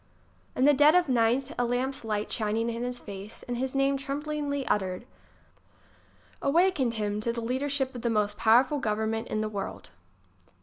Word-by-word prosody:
In 255 - +3
the 290 - +7
dead 295 +4 +6
of 360 -2 +4
night 250 +2 +2
a - - +3
lamp's 250 +2 -1
light 210 -1 -2
shining 225 +1 -1
in 230 +1 -5
his 245 0 -3
face, 200 -1 -9
and 245 - -4
his 260 +2 -3
name 275 0 +2
tremblingly 285 0 -3
uttered, 190 +1 -1 1.4
awakened 285 -6 +2
him 210 -1 -2
to 235 - -1
the 235 - -4
leadership 265 +3 -1
of 245 - -7
the 235 - 0
most 210 -2 +1
powerful 250 +7 +4
govern 220 -2 -1
ment 225 0 -3
in 215 - -2
the 215 - -1
world. 200 -2 -6
245 Hz, 175 wpm, -28 LUFS, 220-275 Hz, 1.4 s, the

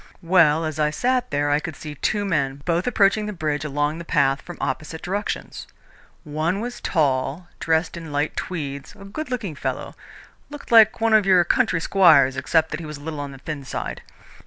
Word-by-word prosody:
Well, 165 -3 +4
as 155 -1 -4
I 150 0 +3
sat 250 +10 0
there 145 0 0
I 145 - +3
could 160 -1 -6
see 150 +1 -8
two 205 +8 -1
men, 140 -6 -1
both 170 +3 0
approaching 210 -2 +2
the 210 - -4
bridge 155 -4 -2
along 145 +2 -1
the - - -6
path 140 -4 +1
from 175 - -10
opposite 155 +4 -4
directions. 200 +3 -4 0.6
One 155 +4 -1
was 240 +2 -5
tall, 150 +2 0
dressed 160 +1 0
in 165 -3 -8
light 145 +2 -1
tweeds, 140 -6 -5
a 195 - -11
good 270 +9 -6
looking 230 -9 -3
fellow 140 - -4 0.6
looked 290 -3 -10
like 225 0 +6
one 225 -1 +3
of 210 -2 +4
your 185 -2 +6
country 220 -2 +1
squires 160 -8 +5
except 160 +4 +1
that 155 - -3
he 165 - -7
was 150 -1 -7
a - - -14
little 155 0 -5
on 140 -1 -5
the 135 - -10
thin 145 +1 -6
side. - - -5
160 Hz, 200 wpm, -23 LUFS, 145-195 Hz, 0.6 s, like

